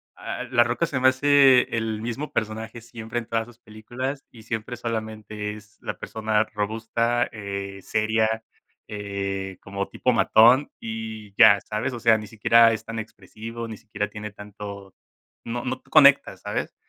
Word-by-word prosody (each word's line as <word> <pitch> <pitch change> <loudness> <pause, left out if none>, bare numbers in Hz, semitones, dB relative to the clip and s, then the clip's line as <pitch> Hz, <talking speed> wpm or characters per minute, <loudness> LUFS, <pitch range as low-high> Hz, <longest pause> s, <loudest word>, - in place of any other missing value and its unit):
A - - -6
a - - -2
La 120 -1 +3
Roca 120 +8 0
se 140 -4 -2
me 130 - +5
hace 135 -1 +5
el 110 -1 -2
mismo 125 +6 -4
personaje 110 +2 -3
siempre 115 0 -7
en 120 - -2
todas 115 0 -2
sus 120 -2 -16
películas, 120 +5 -6
y 115 -2 -15
siempre 115 +2 -4
solamente 110 -2 -4
es 105 0 -16
la - - -5
persona 110 -1 0
robusta, 115 +3 0
eh, 100 -2 -6
seria, 110 +2 0 0.4
eh, 100 -2 -4
como 100 0 -4
tipo 125 - 0
matón 120 +5 +5
y 110 -2 -6
ya, 110 -3 +8
¿sabes? 105 +5 -3
O 120 - -5
sea, 115 -1 +4
ni 105 - -8
siquiera 115 +2 +5
es 110 - -5
tan 115 0 -5
expresivo, 115 +1 -8
ni 110 - -7
siquiera 105 -1 -4
tiene 105 0 -7
tanto 100 -1 -9 0.5
no 120 +1 -4
no 130 0 -3
conecta, 140 -2 +5
¿sabes? - - -4
110 Hz, 165 wpm, -24 LUFS, 105-120 Hz, 0.5 s, ya